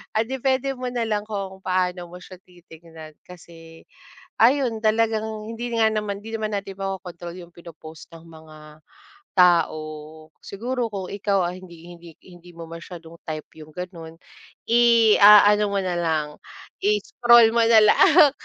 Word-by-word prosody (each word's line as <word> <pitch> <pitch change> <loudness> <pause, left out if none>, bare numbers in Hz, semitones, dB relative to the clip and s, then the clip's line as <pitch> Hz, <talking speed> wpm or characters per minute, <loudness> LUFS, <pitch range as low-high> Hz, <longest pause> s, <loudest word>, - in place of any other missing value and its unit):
Ah, 220 - +1
depende 265 +1 -1
mo 255 0 -5
nalang 225 -4 -2
kung 195 -3 -6
paano 180 -1 -2
mo 180 - -11
siya 185 0 -13
titignan 165 -3 -15
kasi, 165 -2 -15 0.6
ayun 245 -2 +2
talagang 220 -1 -1
hindi 235 +1 -6
nga 220 -1 +3
naman 210 -2 -3
hindi 225 +1 -10
naman 215 -1 -4
natin 195 -1 -9
makokontrol 180 -3 -7
yung 175 -1 -13
pino-post 160 -2 -13
ng 165 0 -14
mga 160 -1 -15 0.8
tao. 155 -3 0
Siguro 240 +3 -4
kung 190 -3 -6
ikaw 200 -2 -1
ay 180 +1 -10
hindi 170 -1 -14
hindi 170 -1 -13 0.2
hindi 175 -1 -16
mo 165 0 -10
masyadong 170 0 -11
type 155 -1 -6
yung 155 0 -13
gano'n. 170 -3 -9 0.5
I-aano 210 -3 +5
mo 200 - 0
nalang 160 -5 -3 0.5
i-scroll 245 - +4
mo 235 - +3
na 225 -1 +6
lang 290 +7 +5
185 Hz, 140 wpm, -22 LUFS, 170-220 Hz, 0.8 s, na